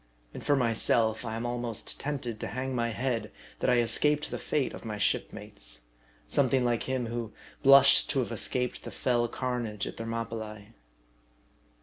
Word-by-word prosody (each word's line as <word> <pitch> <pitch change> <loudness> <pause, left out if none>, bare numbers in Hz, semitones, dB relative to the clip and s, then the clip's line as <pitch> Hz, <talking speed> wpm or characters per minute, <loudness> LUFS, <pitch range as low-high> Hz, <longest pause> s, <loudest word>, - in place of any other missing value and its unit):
And - - -8
for 145 - +3
myself 115 -2 +2
I 110 -2 -4
am 115 +1 -3
almost 120 -2 -3
tempted 130 -6 -3
to - - -4
hang 130 +2 -3
my 115 -1 0
head, 115 -2 -2 0.3
that - - +1
I 125 - +5
escaped 150 +5 +1
the - - -3
fate 145 -4 -1
of - - -9
my 110 -2 -4
shipmates; - - -2 0.5
something 130 -2 +2
like 120 +1 0
him 130 -2 0
who 115 -1 -4 0.3
blushed 140 0 +7
to 140 - +1
have 120 - -4
escaped 125 +2 0
the - - -7
fell 120 -2 +1
carnage 120 -4 -3
at - - -7
Thermopylae. 115 -2 -5
120 Hz, 160 wpm, -29 LUFS, 115-130 Hz, 0.5 s, blushed